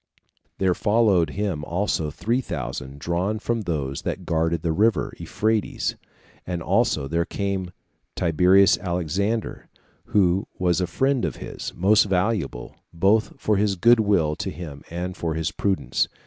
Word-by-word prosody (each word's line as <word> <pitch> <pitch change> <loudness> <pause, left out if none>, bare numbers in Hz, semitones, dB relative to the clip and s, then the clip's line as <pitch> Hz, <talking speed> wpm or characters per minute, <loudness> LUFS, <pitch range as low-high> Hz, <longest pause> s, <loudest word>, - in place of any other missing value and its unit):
There 95 -1 +2
followed 105 -6 +3
him 95 -4 -2
also 85 -2 -1
three 115 - -1
thousand 70 - -5
drawn 85 +8 -1
from 115 +1 -2
those 75 -8 -3
that - - -4
guarded 80 0 0
the 85 - +1
river 105 +5 +1
Euphrates; 110 -1 -1 0.5
as 90 -1 -2
also 95 - +1
there 85 +4 0
came 95 0 -3 0.5
Tiberius 90 +4 +4
Alexander, 95 +5 -2 0.4
who 95 -1 +2
was 90 0 +1
a 90 - 0
friend 135 +6 +1
of 75 - -1
his, - - -6
most 105 +5 +4
valuable, 95 - -1
both 100 +6 +1
for 105 -1 +1
his 100 -1 +1
good 120 +5 +5
will 90 -8 +2
to - - -3
him, 75 -3 -8
and 90 +2 -4
for 80 -4 -2
his 80 0 -1
prudence. 100 -2 0
90 Hz, 145 wpm, -24 LUFS, 80-105 Hz, 0.5 s, good